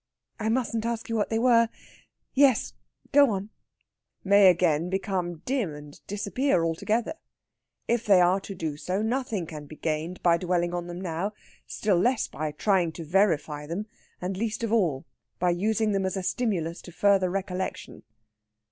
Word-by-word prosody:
"I 220 0 -1
mustn't 230 -2 0
ask 230 0 -3
you 230 - -1
what 210 - 0
they 225 - 0
were?... 230 -1 +4 0.6
Yes, 270 -4 +3 0.4
go 285 -1 +6
on." 200 0 -3 0.7
"May 200 0 +6
again 170 -2 +2
become 185 -3 -2
dim 245 - -1
and 150 0 -12
disappear 205 0 0
altogether. 215 - -1 0.7
If 235 -1 0
they 195 -3 +7
are 180 +2 +4
to 195 0 -8
do 160 -4 -4
so, 185 +6 -2
nothing 230 -5 -1
can 150 -2 -9
be 155 - -10
gained 160 +3 -3
by 170 -1 +5
dwelling 175 -1 0
on 175 0 -3
them 175 0 -6
now 185 +3 -3 0.3
still 200 -5 +1
less 240 +5 +2
by 155 +2 -4
trying 175 +2 +1
to 165 - -7
verify 155 -4 +1
them 180 +7 -3 0.3
and 185 +2 -3
least 220 +2 -2
of 225 -1 -1
all 165 -12 +1 0.3
by 180 0 +2
using 215 +4 +1
them 195 -1 0
as 190 - -3
a 190 - -3
stimulus 180 -7 -1
to 175 - -11
further 195 +1 +3
recollection." 185 0 -4
190 Hz, 165 wpm, -27 LUFS, 170-220 Hz, 0.7 s, they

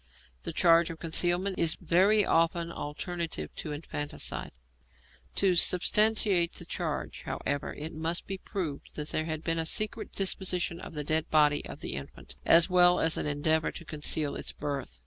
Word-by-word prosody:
The - - -4
charge 170 0 +4
of 165 - -7
concealment 175 +3 +1
is 165 -1 +2
very 200 +4 +3
often 165 +1 +1
alternative 160 - -5
to 155 - -5
infanticide. 145 -1 -4 0.8
To 195 -2 +3
substantiate 185 0 +4
the - - -6
charge, - - -4
however, 145 0 -3
it 155 +3 -6
must 165 +2 -3
be 195 -1 -6
proved 175 -10 -6
that 150 0 -4
there 155 - -1
had 160 -1 -4
been 165 0 0
a 165 - -1
secret 215 +5 +1
disposition 180 -3 +1
of 165 - -10
the 150 - -2
dead 155 +2 -1
body 150 -1 +3
of - - -10
the - - -5
infant, 70 +1 -9
as 165 0 +6
well 180 -1 +4
as 160 0 +2
an - - -2
endeavour 155 +2 +1
to 170 - -9
conceal 150 -1 0
its - - -5
birth. 140 - -5
165 Hz, 165 wpm, -29 LUFS, 150-180 Hz, 0.8 s, as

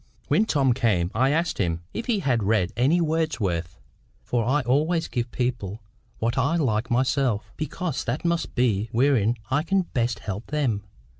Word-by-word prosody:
When 220 - +4
Tom 135 - +2
came, 105 -8 +1
I 130 +4 +3
asked 165 +3 0
him 85 -3 -1
if 235 - -4
he 220 -5 +1
had 125 -8 +1
read 100 -3 +1
any 130 +9 +3
of 170 - +2
Wordsworth. 100 - -1 0.4
For 120 -2 0
I 135 +6 +2
always 155 +7 +1
give 120 0 -2
people 115 -5 -3 0.3
what 115 +3 0
I 140 +6 +2
like 115 -8 0
myself, 120 -4 +1
because 160 -1 -3
that 125 +9 -2
must 170 0 -1
be 115 -4 +1
wherein 120 -3 +3 0.2
I 145 +3 +3
can 190 +3 +1
best 120 -7 -1
help 100 +2 -6
them. 135 -9 0
125 Hz, 170 wpm, -25 LUFS, 110-150 Hz, 0.4 s, When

